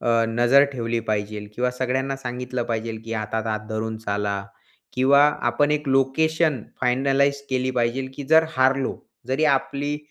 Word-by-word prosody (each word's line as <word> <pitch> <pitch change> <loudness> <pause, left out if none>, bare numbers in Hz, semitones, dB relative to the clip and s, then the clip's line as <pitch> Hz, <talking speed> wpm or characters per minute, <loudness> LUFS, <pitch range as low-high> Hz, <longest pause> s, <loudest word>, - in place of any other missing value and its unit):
अ, 115 -1 +2
नजर 120 +4 +5
ठेवली 115 -2 -2
पाहिजेल 105 0 -3
किंवा 125 +2 0
सगळ्यांना 130 +2 -2
सांगितलं 125 -1 -4
पाहिजेल 115 -1 -3
की 115 - -6
हातात 110 +1 -3
हात 110 -1 -1
धरून 110 0 -3
चाला, 100 -2 -2 0.5
किंवा 135 +2 +4 0.3
आपण 145 +5 +1
एक 150 -1 -1
लोकेशन 145 +1 +2 0.2
फायनलाईज 135 +2 +2
केली 130 0 0
पाहिजेल 120 +3 0
की 145 - -6
जर 160 0 +7
हारलो, 135 +1 +2 0.3
जरी 135 +4 +1
आपली 145 +2 -2
125 Hz, 150 wpm, -23 LUFS, 115-135 Hz, 0.5 s, जर